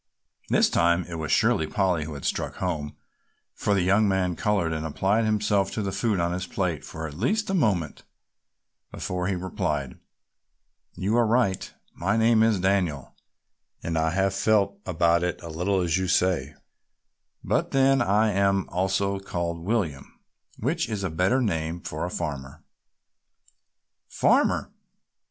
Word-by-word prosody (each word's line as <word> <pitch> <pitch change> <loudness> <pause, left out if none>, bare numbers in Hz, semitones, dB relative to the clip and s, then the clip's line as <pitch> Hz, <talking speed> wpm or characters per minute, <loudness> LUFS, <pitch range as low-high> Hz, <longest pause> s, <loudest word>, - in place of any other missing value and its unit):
This - - +4
time 85 +1 +2
it 85 -2 -6
was 80 -1 -3
surely 80 - +3
Polly 90 -3 0
who 75 -1 -7
had 70 - -8
struck - - -2
home, 80 -5 -3 0.6
for 100 - 0
the 95 - +2
young 100 +4 +3
man 95 -2 0
colored 100 -6 0
and 80 -1 -3
applied 95 +8 +1
himself 105 -2 +1
to 110 - -2
the 100 - -2
food 100 0 0
on 85 0 0
his 90 +1 -3
plate 90 -6 -2
for 80 0 -7
at 75 - -9
least 205 - 0
a - - -1
moment 100 - 0 0.9
before 90 -1 -3
he 100 - 0
replied: 75 -7 -3 1.0
"You 100 +4 -1
are 120 -2 +3
right, 110 -5 +1 0.2
my 100 +5 0
name 115 0 +4
is 110 -3 +3
Daniel 90 -8 0 0.7
and 85 - -2
I 80 0 +2
have 95 +3 +1
felt 100 0 +1
about 85 -1 +2
it 90 0 -2
a 85 - -7
little 90 +4 0
as 85 +1 +1
you 95 - -1
say, 90 -6 +1 0.9
but - - 0
then 135 0 +3
I 105 +2 +3
am 100 -1 +1
also 95 +2 0
called 85 -3 -3
William, 85 -7 -3 0.4
which 160 +7 -1
is 105 -3 -3
a 95 - -2
better 95 +11 +2
name 80 -5 -2
for 80 -1 -4
a - - -3
farmer." 75 -3 -5 1.4
"Farmer?" - - +2
95 Hz, 155 wpm, -25 LUFS, 85-100 Hz, 1.4 s, This